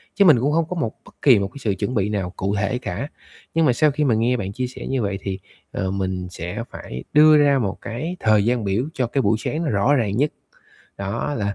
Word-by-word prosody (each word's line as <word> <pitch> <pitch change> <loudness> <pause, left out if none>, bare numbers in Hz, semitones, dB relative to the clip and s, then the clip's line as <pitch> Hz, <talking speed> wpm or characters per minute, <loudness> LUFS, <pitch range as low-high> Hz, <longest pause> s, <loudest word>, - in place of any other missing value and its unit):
Chứ 200 - +5
mình 150 -9 +7
cũng 140 +4 +1
không 165 0 +2
có 180 - -3
một 120 -10 -2
bất - - -17
kỳ 125 -7 +6
một 100 - -1
cái 140 - -13
sự 105 -6 -1
chuẩn 125 - -1
bị 105 0 +1
nào 100 -4 -2
cụ 100 +2 -1
thể 105 +5 0
cả. 140 - -4 0.5
Nhưng 165 0 +3
mà 125 - +4
sau 150 +4 +3
khi 150 +2 -1
mà 125 -6 +3
nghe 120 +3 +2
bạn 100 -3 -4
chia 125 +3 -2
sẻ 125 - -8
như 135 -2 0
vậy 100 -2 -1
thì, 95 -1 -4 0.3
ờ, 95 -1 -2
mình 95 -2 -2
sẽ 90 +6 -5
phải 65 +1 -7
đưa 155 +1 +7
ra 140 -2 +4
một 100 -5 -2
cái 155 +10 -4
thời 110 -2 +3
gian 120 -1 +1
biểu 100 +5 0
cho 125 -2 0
cái 135 +3 0
buổi 110 0 +2
sáng 160 +8 -2
nó 155 - -1
rõ 105 +6 +2
ràng 105 -6 0
nhất. 145 +3 +2 0.7
Đó, 105 +9 -2
là 100 -2 -2
115 Hz, 260 wpm, -22 LUFS, 100-140 Hz, 0.7 s, mình